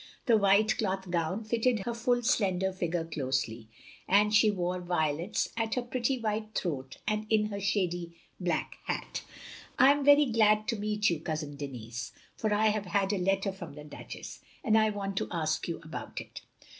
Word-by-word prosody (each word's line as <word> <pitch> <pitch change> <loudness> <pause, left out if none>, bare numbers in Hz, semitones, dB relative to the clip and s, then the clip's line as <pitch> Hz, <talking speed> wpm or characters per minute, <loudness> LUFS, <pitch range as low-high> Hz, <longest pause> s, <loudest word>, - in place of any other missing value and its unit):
The 235 - +5
white 200 +1 +4
cloth 190 -3 -2
gown 175 +5 -1
fitted 230 0 +1
her 235 - -3
ftdl 245 +1 0
slender 190 -7 +2
figure 175 -2 -2
closely, 130 -7 -2 0.4
and 210 +2 +4
she 215 0 +6
wore 180 -2 -1
violets 170 0 0
at 225 -1 -1
her 250 - 0
pretty 255 +1 -1
white 215 -1 -3
throat 135 -7 -3
and 215 0 -1
in 215 -1 +2
her 200 - -3
shady 175 -4 -1 0.2
black 175 -4 -2
hat. - - -3 0.6
I 265 +2 +7
am 285 0 +1
very 290 +1 +7
glad 215 -3 +3
to - - +1
meet 210 -1 +1
you. 165 - -1
Cousin 155 -2 -4
Denis, 120 -5 -6 0.2
for 215 - -1
I 215 +1 +4
have 210 -1 -1
had 195 +2 +1
a 200 - 0
letter 195 +2 +1
from 180 -6 -9
the 150 0 -10
Duchess, 150 - -9 0.2
and 220 -4 +3
I 220 0 +5
want 195 -2 -4
to - - 0
ask 155 -2 -1
you 170 - -3
about 155 - -6
it. - - -9
195 Hz, 180 wpm, -30 LUFS, 170-220 Hz, 0.6 s, I